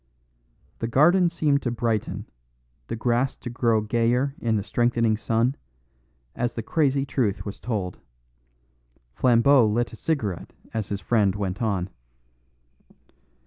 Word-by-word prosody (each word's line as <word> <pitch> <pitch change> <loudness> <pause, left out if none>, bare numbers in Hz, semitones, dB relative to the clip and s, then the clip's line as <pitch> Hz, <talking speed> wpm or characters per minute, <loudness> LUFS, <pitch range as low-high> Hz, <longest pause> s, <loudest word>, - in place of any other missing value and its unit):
The 115 - -2
garden 170 +9 +4
seemed 150 -4 +1
to 125 - -1
brighten, 115 -2 -2 0.6
the - - -3
grass 120 +3 0
to 120 - -7
grow 115 -3 +2
gayer 120 +5 +1
in 115 -2 0
the 105 - -1
strengthening 115 0 +1
sun, 115 +4 0 0.8
as 120 0 -2
the 115 - -3
crazy 140 0 +1
truth 125 -7 -1
was 100 - -6
told. 100 -7 -3 1.1
Flambeau 125 - +5
lit 115 +3 0
a - - -6
cigarette 110 - -3 0.2
as 110 -3 -3
his 100 -1 -3
friend 105 -5 +2
went 100 -1 -3
on. 100 -5 -1
115 Hz, 130 wpm, -25 LUFS, 110-130 Hz, 1.1 s, Flambeau